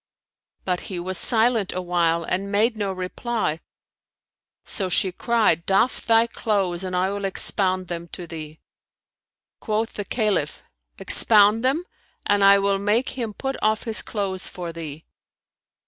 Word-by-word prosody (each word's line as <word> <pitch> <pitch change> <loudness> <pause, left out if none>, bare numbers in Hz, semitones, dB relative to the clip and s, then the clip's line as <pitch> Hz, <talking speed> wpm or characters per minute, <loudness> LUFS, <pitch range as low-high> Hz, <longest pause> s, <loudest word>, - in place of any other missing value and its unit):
But 180 -1 0
he 185 -3 -4
was 185 +1 -1
silent 225 -3 +3
awhile 175 -2 0
and 195 +4 -3
made 220 +3 +2
no 205 -2 -2
reply: 185 -1 -3 1.1
so 190 -2 -3
she 185 +1 +2
cried 215 -5 +1
"Doff 195 +6 +1
thy 225 0 +5
clothes 195 -6 -1
and 185 -1 -4
I 185 +2 +1
will 200 0 -5
expound 185 -1 0
them 170 0 -6
to 175 +1 -8
thee." 155 -2 -9 1.0
Quoth 220 +1 -2
the 205 - -5
Caliph 205 -10 -1 0.3
"Expound 210 +1 +4
them, 275 +7 +1 0.4
and 205 -1 +2
I 200 0 +7
will 200 0 +1
make 210 +5 +1
him 230 -5 -5
put 270 0 -4
off 215 0 +1
his 225 -2 +3
clothes 195 -3 -3
for 175 -2 -7
thee." 160 -2 -8
195 Hz, 145 wpm, -23 LUFS, 180-220 Hz, 1.1 s, I